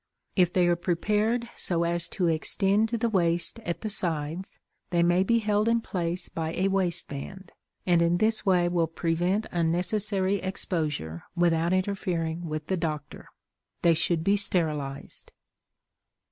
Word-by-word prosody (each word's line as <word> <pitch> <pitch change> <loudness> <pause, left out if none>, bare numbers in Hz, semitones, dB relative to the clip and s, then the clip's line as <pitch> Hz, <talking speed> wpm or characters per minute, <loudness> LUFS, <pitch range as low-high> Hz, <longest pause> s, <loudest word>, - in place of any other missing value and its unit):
If 180 -3 +3
they 180 -1 +3
are 175 - +3
prepared 210 +7 0
so 170 -2 0
as 170 0 -1
to 180 - +1
extend 195 +6 +2
to 235 - -1
the 235 - 0
waist 175 0 +1
at 175 -7 -4
the 215 - -3
sides, 170 -2 +1 0.3
they 170 -1 +2
may 175 +1 +3
be 230 +5 +2
held 210 0 +1
in 230 0 +3
place 175 -4 -3
by 160 0 -4
a 190 +2 +1
waistband, 180 -1 -3 0.3
and 175 -2 +3
in 170 +1 +3
this 220 +3 +2
way 180 -4 +3
will 175 -2 +1
prevent 175 +6 -1
unnecessary 185 +4 0
exposure 155 - -3
without 170 -1 +2
interfering 175 -3 -1
with 155 0 -4
the 190 - -1
doctor. 155 -3 -5 0.6
They 170 - +5
should 165 0 0
be 200 +3 +3
sterilized. 150 -8 -1
175 Hz, 145 wpm, -27 LUFS, 165-195 Hz, 0.6 s, They